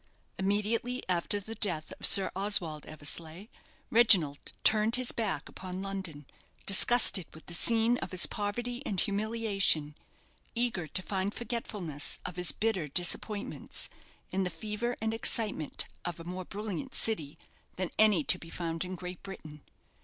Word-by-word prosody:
Immediately 215 +6 -1
after 180 +3 0
the 220 +3 -8
death 175 -8 -1
of - - +7
Sir 195 -1 +9
Oswald 180 -6 +2
Eversleigh, 160 +6 -3 0.4
Reginald 185 -11 +4
turned 220 +1 +5
his 255 -1 +1
back 225 -2 -2
upon 185 0 -7
London, 190 -7 -5 0.4
disgusted 195 -2 +5
with 160 - -11
the 175 - -5
scene 230 +6 +2
of - - -5
his 185 -1 +5
poverty 240 +4 -4
and 200 -9 -2
humiliation, 200 -7 +1 0.6
eager 230 -9 -1
to 185 - 0
find 195 +1 -2
forgetfulness 210 - -2
of 180 - -5
his 180 -3 +3
bitter 205 -8 -1
disappointments 180 +7 -1 0.4
in 190 0 0
the 180 - -1
fever 215 +7 -4
and 220 0 -1
excitement 215 -8 -1 0.2
of 175 -1 -4
a - - -8
more 180 +2 -6
brilliant 210 +7 -6
city 160 -9 -2 0.4
than 185 -2 -3
any 210 -7 +5
to - - +4
be 165 - -11
found 165 -1 -4
in 185 0 -6
Great 180 0 -8
Britain. 155 -7 -10
195 Hz, 145 wpm, -30 LUFS, 170-220 Hz, 0.6 s, Sir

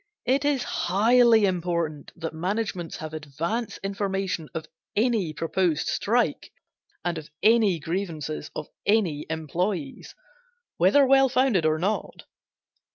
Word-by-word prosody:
It 265 +3 +2
is 285 -3 +1
highly 225 +3 +4
important 170 -5 -2
that 165 -1 -5
managements 180 0 -3
have 155 0 -7
advance 160 - -3
information 195 -4 -2
of 160 - -4 0.3
any 215 -6 +1
proposed 165 0 0
strike, 225 -7 0 0.5
and 170 -2 -1
of 155 - -12
any 215 -5 +4
grievances 160 -2 -4
of 155 - -5 0.2
any 190 -9 +1
employees, 160 0 -3 0.6
whether 285 -1 +5
well 270 0 +5
founded 245 -11 +2
or 155 0 +2
not. 195 +6 -2
185 Hz, 115 wpm, -25 LUFS, 160-225 Hz, 0.6 s, whether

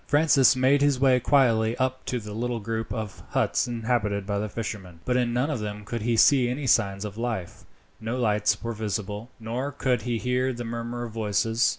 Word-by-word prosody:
Francis 145 -2 +5
made 130 +2 +3
his 140 -2 +3
way 130 -2 +4
quietly 120 -4 +3
up 130 0 -1
to 125 - -1
the 105 -1 -8
little 120 +2 -2
group 115 +1 -4
of 110 -2 -5
huts - - +1
inhabited 115 -4 -1
by 100 0 -1
the 105 +1 -3
fishermen, 95 -6 -6
but 125 - +1
in 125 -1 +1
none 125 +6 0
of 135 - -2
them 105 -1 -5
could 115 +1 -4
he 115 +1 0
see 130 0 +5
any 135 +3 -3
signs 100 -4 +2
of 105 +1 -7
life 115 -7 -4 0.3
no 115 +3 -3
lights 105 -3 +1
were 115 0 -2
visible, 105 +1 -4
nor 120 +5 -3
could 130 -3 0
he 120 -2 -2
hear 125 +2 0
the 120 0 -6
murmur 120 +1 -4
of 115 -2 -7
voices. 110 +2 +1
115 Hz, 205 wpm, -26 LUFS, 105-125 Hz, 0.3 s, Francis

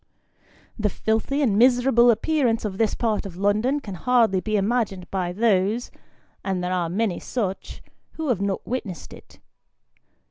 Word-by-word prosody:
The 210 -1 +1
filthy 225 +9 -1
and 210 -6 +2
miserable 245 0 +5
appearance 240 -2 +1
of 195 -2 -4
this 225 -2 +1
part 225 -3 -1
of 175 -3 -11
London 215 +8 +1
can 210 -8 -8
hardly 225 0 +2
be 215 +2 -2
imagined 200 -3 -1
by 185 -2 -1
those 210 +2 +1 0.5
(and 190 -2 -2
there 180 +1 -1
are 175 -2 -1
many 200 +1 -1
such) 200 -6 -4 0.3
who 320 -3 -4
have 220 -6 +1
not 200 -1 -2
witnessed 215 -9 -5
it. - - -15
215 Hz, 150 wpm, -23 LUFS, 190-245 Hz, 0.5 s, miserable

